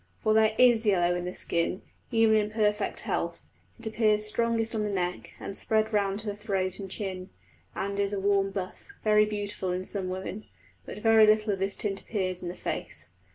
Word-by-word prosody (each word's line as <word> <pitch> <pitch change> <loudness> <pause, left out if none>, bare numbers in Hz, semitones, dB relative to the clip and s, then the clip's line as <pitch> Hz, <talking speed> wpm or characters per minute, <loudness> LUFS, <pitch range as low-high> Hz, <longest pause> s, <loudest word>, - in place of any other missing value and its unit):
For 215 - +1
there 220 0 +4
is 240 -3 +5
yellow 175 -5 +3
in 175 0 -3
the 180 - -5
skin, 170 +2 -1 0.3
even 225 -2 +4
in 210 -1 +2
perfect 210 -1 0
health; - - -2 0.4
it 230 - -12
appears 215 -1 +2
strongest 230 +1 0
on 220 - 0
the 210 - -1
neck, 180 -2 -3
and 195 - -6
spread 220 +1 0
round 200 0 +1
to - - -12
the 205 -1 -3
throat 195 -3 -2
and 195 -1 -6
chin, 185 -1 -5 0.5
and 200 +1 -3
is 200 0 +1
a 200 - -2
warm 195 0 +2
buff, 190 -2 -5 0.2
very 210 0 +5
beautiful 205 -3 -3
in 180 +1 -3
some 190 -2 -3
women; 190 +3 -5 0.4
but - - -7
very 220 0 +6
little 215 0 +3
of 195 - -4
this 195 +1 -1
tint 195 -2 -2
appears 185 -4 -2
in 175 - -4
the 175 - -6
face. 85 - -5
205 Hz, 200 wpm, -28 LUFS, 190-215 Hz, 0.5 s, very